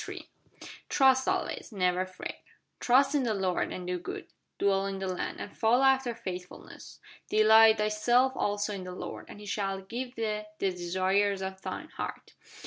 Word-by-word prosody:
TRUST 265 -1 +4
ALWAYS: - - -2
NEVER 185 -2 +1
FRET 185 - -8 0.4
Trust 270 +3 +4
in 290 - +2
the 230 -4 0
Lord, 190 -2 0
and 180 - -6
do 180 0 -2
good; 175 - -6 0.3
Dwell 195 -1 +2
in 195 0 -4
the 190 - -4
land, 185 -1 -3
and 205 - -7
follow 240 +4 +3
after 265 -3 +3
faithfulness: 180 -5 -8 0.3
Delight 220 +1 +7
thyself 240 +5 +2
also 205 +1 -1
in 190 -2 -5
the 180 0 -7
Lord; - - -7
And - - -10
He 210 - -10
shall 195 -1 -2
give 245 +6 -6
thee 215 -2 -2 0.2
the 195 -2 0
desires 190 +3 0
of 190 0 -6
thine - - -6
heart. - - -7
205 Hz, 165 wpm, -29 LUFS, 190-230 Hz, 0.4 s, Delight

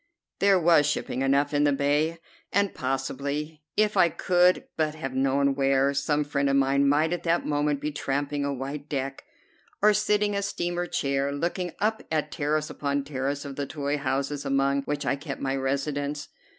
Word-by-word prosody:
There 195 -1 +5
was 165 -3 +5
shipping 130 - -2
enough 140 +2 +2
in 145 0 +3
the 145 - +4
bay, 145 +4 +1 0.3
and 200 0 +1
possibly, 140 +4 -3 0.2
if 215 0 +3
I 170 - +5
could 180 +1 +2
but 155 -1 0
have 135 -5 -5
known 135 +1 +2
where, 135 0 +2
some 145 +1 +1
friend 140 -1 0
of 135 - +2
mine 140 +1 +3
might 155 +4 +2
at 175 - -2
that 170 0 +1
moment 145 -1 0
be 150 +1 -3
tramping 145 0 -2
a 140 - -1
white 140 +2 -5
deck, 135 -1 -3 0.5
or 210 +1 +5
sitting 210 0 +2
in 200 - 0
a - - -2
steamer 175 -3 -2
chair, 140 -2 0
looking 175 +4 -2
up 220 +1 0
at 155 -1 0
terrace 155 +1 -1
upon 140 -1 -1
terrace 140 +1 -3
of 140 -1 -7
the 140 -1 -2
toy 145 0 -2
houses 140 +1 -2
among 140 0 +1
which 145 0 -2
I - - +1
kept 140 0 -6
my 135 0 -1
residence. 140 +2 -2
145 Hz, 185 wpm, -26 LUFS, 140-155 Hz, 0.5 s, There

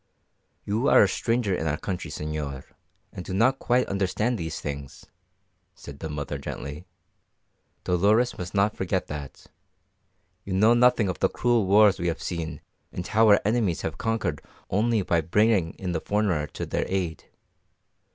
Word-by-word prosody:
"You 110 +7 0
are - - +7
a - - +4
stranger 115 -4 0
in 80 -3 -2
our 75 0 0
country, 90 +2 -5
señor, 75 -3 -5 0.5
and 90 - -7
do 95 - -5
not 130 +6 +3
quite 125 +1 +2
understand 100 +5 -1
these 80 -6 -4
things," 70 -2 -7 0.7
said 70 -4 -11
the 80 - -5
mother 75 -1 -4
gently. 75 +5 -7 1.0
"Dolores 105 +8 +2
must 90 +2 -7
not 100 +2 +2
forget 95 0 -1
that. 75 -2 -8 1.0
You 95 - -5
know 105 +5 +5
nothing 120 -3 +4
of 90 - -3
the - - +2
cruel 120 -5 +1
wars 100 0 +5
we 85 - -1
have 85 - -1
seen 85 -2 -5 0.3
and 90 - -5
how 110 +1 +3
our 100 - +7
enemies 110 -6 +1
have - - -4
conquered 115 0 -1 0.3
only 110 +2 +2
by 85 -2 +1
bringing 95 +1 +2
in 95 -2 -4
the 80 -2 -2
foreigner 100 -8 0
to - - -6
their - - -2
aid. 90 -4 -3
95 Hz, 160 wpm, -26 LUFS, 80-110 Hz, 1.0 s, are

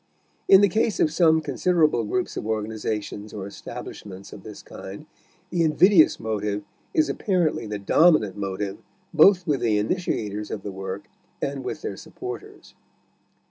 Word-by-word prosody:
In 195 0 +8
the 205 - +6
case 215 +2 0
of 155 - +3
some 160 -2 +4
considerable 155 -3 +2
groups 185 - -2
of - - -4
organizations 110 -1 -3
or 100 -2 -5
establishments 100 -1 -9
of - - -10
this - - -10
kind 100 +10 -9 0.5
the 175 - +1
invidious 165 +2 +5
motive 105 -2 -2 0.3
is 315 -1 +2
apparently 175 - 0
the 105 0 -3
dominant 105 - +4
motive 100 0 -4 0.3
both 180 +3 +6
with 145 -4 +1
the 115 -3 +1
initiators 105 - -2
of 100 - -5
the 100 - -5
work 95 +1 -6 0.4
and 140 -1 -3
with - - -5
their - - -4
supporters. - - -9
110 Hz, 145 wpm, -24 LUFS, 105-165 Hz, 0.5 s, In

